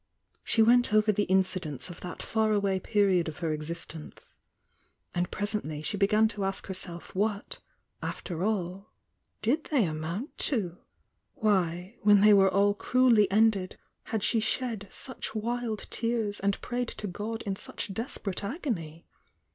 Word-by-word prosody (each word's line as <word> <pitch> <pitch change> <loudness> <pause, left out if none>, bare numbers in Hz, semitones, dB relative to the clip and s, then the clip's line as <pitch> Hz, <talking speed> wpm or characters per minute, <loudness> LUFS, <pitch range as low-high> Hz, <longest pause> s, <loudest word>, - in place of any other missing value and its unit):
She 225 - +4
went 240 -1 +5
over 215 0 +5
the 205 0 0
incidents 185 -7 0
of 175 - -11
that 180 - -6
far 220 -1 +1
away 200 -2 +1
period 195 -5 +2
of 155 - -9
her 165 -3 -1
existence, 155 0 -7 0.4
— - - -41
and 175 0 0
presently 205 -8 -3
she 205 - -1
began 210 +2 +4
to 205 -3 -4
ask 195 0 -2
herself 180 -2 -6
what, 205 +1 -1 0.4
after 175 -1 -4
all, 195 -2 -2 0.5
did 280 +9 +1
they 280 -7 +2
amount 165 - -4
to? 190 - -2 0.6
Why, 185 0 0
when 205 -2 +6
they 210 0 +7
were 195 -1 +6
all 200 +1 +3
cruelly 230 -2 +4
ended, 205 -2 +2 0.3
had 220 -2 -2
she 225 - +3
shed 220 -2 -1
such 260 -3 -7
wild 230 0 -2
tears 230 -3 -1
and 200 0 0
prayed 245 0 -2
to - - -5
God 210 +4 -4
in 195 -3 -2
such 195 - -5
desperate 205 -4 -3
agony? 200 - -4
205 Hz, 150 wpm, -29 LUFS, 180-220 Hz, 0.6 s, they